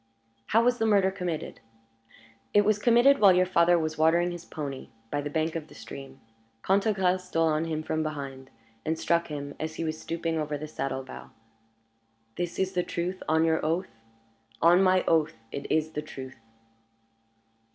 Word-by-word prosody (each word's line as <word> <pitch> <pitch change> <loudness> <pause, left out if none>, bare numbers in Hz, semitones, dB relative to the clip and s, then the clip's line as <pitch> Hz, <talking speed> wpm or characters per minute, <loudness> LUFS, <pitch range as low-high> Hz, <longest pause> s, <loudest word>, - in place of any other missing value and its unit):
"How 225 +2 +3
was 245 0 +2
the 225 - +2
murder 200 -3 +4
committed?" 180 -5 -4 1.0
"It 205 0 +6
was 210 0 +2
committed 240 +5 +5
while 200 -3 +7
your 180 0 +4
father 175 -1 +4
was 155 -1 -2
watering 170 +3 +3
his 175 -1 -8
pony 140 -3 -6 0.2
by 145 - -1
the 145 - -4
bank 160 +2 -1
of 160 -2 -4
the - - -16
stream. 135 -1 -10 0.4
Cantegrel 190 -2 +2
stole 165 -3 0
on 155 +1 0
him 155 -1 -3
from 155 0 -1
behind, 140 -4 -5 0.3
and 160 +1 -1
struck 170 +1 +1
him 145 -2 -6
as 160 0 -4
he - - -3
was 155 -1 -3
stooping 165 -1 -2
over 150 -1 -2
the 155 +2 -6
saddle 135 -3 -3
bow." 130 - -10 1.1
"This 175 -1 -3
is 190 0 0
the 180 - +1
truth, 175 +2 -4
on 160 +1 +3
your 160 -1 +1
oath?" 165 +4 -1 0.7
"On 175 +3 +5
my 185 -1 +4
oath, 160 -1 +3 0.2
it 140 - -6
is 155 0 +1
the 150 - -3
truth." 135 -4 -9
165 Hz, 175 wpm, -27 LUFS, 155-185 Hz, 1.1 s, while